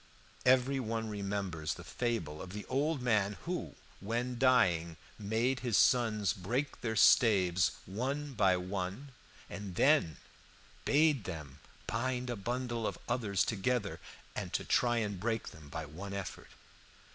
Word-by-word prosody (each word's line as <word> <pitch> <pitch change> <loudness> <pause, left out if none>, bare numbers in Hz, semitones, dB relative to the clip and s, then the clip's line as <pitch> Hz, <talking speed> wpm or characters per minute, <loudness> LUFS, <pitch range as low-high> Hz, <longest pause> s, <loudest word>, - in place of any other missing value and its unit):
Every 130 +1 +4
one 115 -2 -2
remembers 100 -6 -3
the - - -10
fable 110 -12 -2
of 95 0 -8
the 105 - -6
old 140 +1 0
man 105 -4 +2
who, 180 +1 -3 0.2
when 120 +4 -2
dying, 85 -11 +3 0.2
made 115 +5 0
his 120 -6 +1
sons 110 -5 +3
break 120 +8 -3
their 110 -1 -2
staves 95 -6 +5
one 135 +9 -3
by 95 -5 +3
one, 95 +8 -4 0.4
and 100 -3 -7
then 135 - +4 0.7
bade 145 -5 +3
them 75 -6 -7 0.3
bind 125 +1 -1
a - - -2
bundle 120 +1 -2
of - - -4
others 105 -6 +1
together, 110 0 -1 0.4
and - - -4
to - - -1
try 120 -1 +2
and 105 -4 -1
break 110 +2 -1
them 75 -2 -13
by 80 +3 -5
one 95 +7 -7
effort. 100 -3 -6
110 Hz, 140 wpm, -33 LUFS, 95-125 Hz, 0.7 s, staves